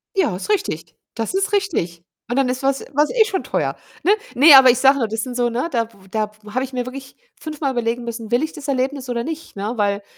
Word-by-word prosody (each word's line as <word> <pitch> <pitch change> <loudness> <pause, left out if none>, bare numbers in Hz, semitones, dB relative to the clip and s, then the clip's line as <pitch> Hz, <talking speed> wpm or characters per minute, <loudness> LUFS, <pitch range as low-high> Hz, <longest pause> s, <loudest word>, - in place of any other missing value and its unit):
Ja, 380 - +2
ist 185 - -7
richtig. 165 - -2 0.2
Das 225 +5 -3
ist 390 +2 0
richtig 245 - -1 0.3
und 245 - -1
dann 270 -1 +3
ist 250 +1 -2
was 275 0 +1
war's 295 +2 +3
eh 460 -3 +4
schon 395 -4 -2
teuer, - - -1 0.3
ne? 385 - +4 0.2
Ne, 290 +4 +8
aber 265 -1 +9
ich 245 - +4
sage 270 +2 +5
nur, 230 - +1
das 220 +1 -3
sind 255 -2 -5
so 240 -1 +1
ne, 240 +6 -1
da 230 -3 -1
w 195 -3 -20
da 215 0 -1
w 210 - -11
habe 255 +2 0
ich 265 0 -7
mir 250 -1 -2
wirklich 265 +1 -9 0.2
fünfmal 305 -3 -3
überlegen 240 -1 -1
müssen: 230 -2 -6
„Will 240 +4 +2
ich 315 - -3
das 300 -2 -9
Erlebnis 265 0 -1
oder 235 -1 -1
nicht,“ 320 +3 -7
ne? 205 +3 -3
Weil 200 -1 0
255 Hz, 255 wpm, -20 LUFS, 230-290 Hz, 0.3 s, aber